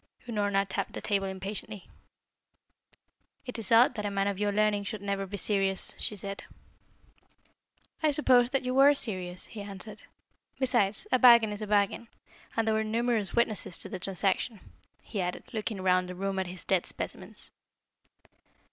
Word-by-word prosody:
Unorna 205 -3 0
tapped - - -3
the - - -5
table 200 -2 0
impatiently. 195 +1 -5 1.6
"It 250 -2 -5
is 220 -2 -4
odd 235 +3 +6
that 210 -4 -5
a 205 - -1
man 195 0 0
of 200 -1 -2
your 205 0 +1
learning 205 0 +1
should 210 -2 -5
never 200 -1 -2
be 200 +2 -6
serious," 195 -1 0
she 210 - -1
said. 200 0 -6 1.6
"I 310 - +3
supposed 255 -4 +4
that 270 -1 0
you 255 0 -2
were 275 +2 +6
serious," 185 -8 -1
he 215 - -8
answered. 200 +1 -7 0.6
"Besides, 240 - +1
a 255 - +4
bargain 235 -4 +7
is 205 +1 -6
a 215 - -4
bargain, 205 +2 +1 0.5
and 225 0 +1
there 220 - +3
were 220 0 +1
numerous 225 -3 0
witnesses 220 -6 +1
to - - -3
the 185 - -5
transaction," 195 +4 -1 0.4
he 205 - -4
added, 180 0 -3
looking 215 -2 -3
round 185 -1 +2
the 180 - -6
room 195 +1 -2
at 190 - -2
his 180 0 -7
dead 190 -2 +1
specimens. - - -6
205 Hz, 165 wpm, -29 LUFS, 195-225 Hz, 1.6 s, bargain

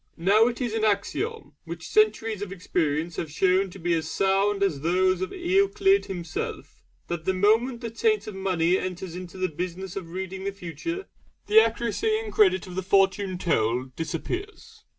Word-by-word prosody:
Now 200 +7 +4
it 245 -1 -3
is 240 -3 -1
an 225 -1 -1
axiom, 310 - -1
which - - -7
centuries 225 - +2
of 205 -2 -5
experience 165 -3 -1
have 160 - -3
shown 190 +3 +2
to 180 - -11
be 175 -1 0
as 160 -1 -1
sound 195 +1 +2
as 160 -9 0
those 185 +3 +2
of 185 - -2
Euclid 390 +2 +2
himself, 175 -4 -5 0.2
that 170 -2 -5
the 190 - +1
moment 225 +6 +2
the 230 -2 -4
taint 430 - +1
of 215 - -6
money 185 -2 +1
enters 185 -1 -5
into 180 0 -8
the 185 0 0
business 180 +3 -5
of 185 -4 -6
reading 190 +2 -5
the 200 - -2
Future 200 - -5 0.4
the 215 +1 +7
accuracy 235 - 0
and 445 -1 -6
credit 190 -4 +4
of 180 - -9
the 190 - -2
Fortune 190 0 +2
told 125 -6 0
disappears. 365 - -5
190 Hz, 175 wpm, -26 LUFS, 175-225 Hz, 0.4 s, the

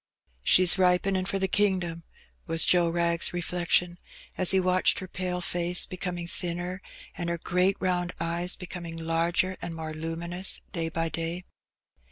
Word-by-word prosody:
''She's 185 - +5
ripenin' 185 +1 +2
for 195 - 0
the 190 0 0
kingdom,^' 185 -4 0 0.5
was 165 0 +4
Joe 175 -2 +4
Wrag's 170 0 +2
re^ 175 - -5
flection^ 175 0 +1 0.4
as 185 - +3
he 190 - +5
watched 185 0 +2
her 185 - -5
pale 180 0 -3
face 175 -1 +2
becoming 180 -1 -5
thinner^ 175 +2 -4 0.4
and 170 -1 -4
her 170 - -1
great 180 +3 +1
round 180 -1 -1
eyes 170 +2 0
becoming 175 -2 -7
larger 170 +3 0
and 165 - -5
more 160 -1 -6
luminous 170 +4 0
day 165 -2 -2
by 165 0 -2
day. 165 +3 -4
175 Hz, 155 wpm, -27 LUFS, 170-185 Hz, 0.5 s, She's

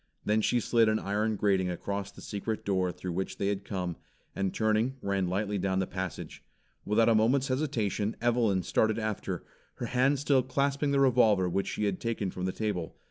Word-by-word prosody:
Then 105 +1 +2
she 120 +3 +2
slid 115 -1 +3
an 110 - +2
iron 105 +2 -1
grating 95 -3 +1
across 100 +3 -4
the - - -13
secret 105 +2 -4
door 95 -2 +1
through 90 +1 -6
which 95 +3 -3
they 100 - 0
had 100 -1 -2
come, 90 -4 -3 0.4
and 95 -1 0
turning 110 +4 +1
ran 100 -4 -1
lightly 100 +2 -1
down 95 0 0
the 95 - +1
passage. 95 -1 -6 0.4
Without 110 +2 +3
a 115 - +5
moment's 125 +5 +3
hesitation, 115 -6 -1
Evelyn 115 -6 +2
started 110 +4 +1
after, 110 -2 -3 0.3
her 120 - -4
hand 130 +4 +2
still 140 -1 +3
clasping 140 +3 0
the 140 0 +2
revolver 115 -8 +4
which 95 +2 -1
she - - -2
had 100 -3 0
taken 110 -5 -2
from 90 - -4
the 95 - 0
table. 95 -5 -3
105 Hz, 190 wpm, -29 LUFS, 95-120 Hz, 0.4 s, a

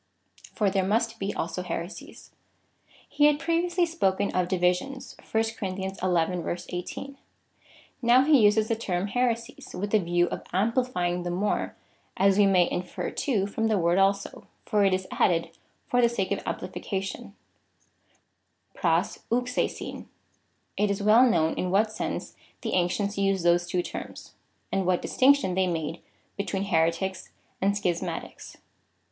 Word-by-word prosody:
For 205 -3 +2
there 190 -1 +1
must 225 +4 0
he 195 +1 -1
also 170 0 -3
heresies. 175 +1 -7 0.8
He 295 - +2
had 295 -1 +3
previously 345 +2 +1
spoken 200 - 0
of 180 -1 0
divisions, 180 +9 -1
(verse 220 0 0
18.) 185 - -2 0.8
Now 245 +2 +5
he 290 -3 +5
uses 210 +1 +4
the 230 - +1
term 190 -5 -2
here 245 +4 +1
sies, 230 +3 -12
with 205 +2 -3
the 215 - +4
view 175 -1 +2
of - - -4
amplifying 195 -4 0
the 175 - -3
more, 190 +4 -1 0.4
as 195 +1 +4
we 205 - +6
may 180 -3 +4
infer, 180 0 -3
too, 215 -9 0
from 225 +2 -1
the 215 -2 +2
word 175 +1 +2
also, 195 +1 0 0.2
for 210 -1 +2
it 195 - +4
is 185 0 -4
added 170 -2 +1 0.4
for 245 - +2
the 235 - +5
sake 200 -5 -2
of 200 - 0
am - - 0
plification, 195 +2 -5 1.4
(tt/jo? 170 +2 0
av^aiv.) 250 +1 -2 0.7
It 210 0 +2
is 200 0 -1
well 230 +5 +6
known 160 -8 +2
in 180 - -2
what 210 +4 +2
sense - - -4 0.3
the - - -3
ancients 200 +3 0
used 195 -2 +1
those 175 0 +3
two 175 +1 0
terms,^ - - -8 0.4
and 195 -2 0
what 180 -1 +1
distinction 270 -7 +3
they 185 0 +2
made 165 -1 -3 0.4
between 200 -1 -2
Heretics 170 +1 0 0.3
and 200 +1 +2
Schismatics. 180 -4 -4
195 Hz, 145 wpm, -27 LUFS, 180-225 Hz, 1.4 s, we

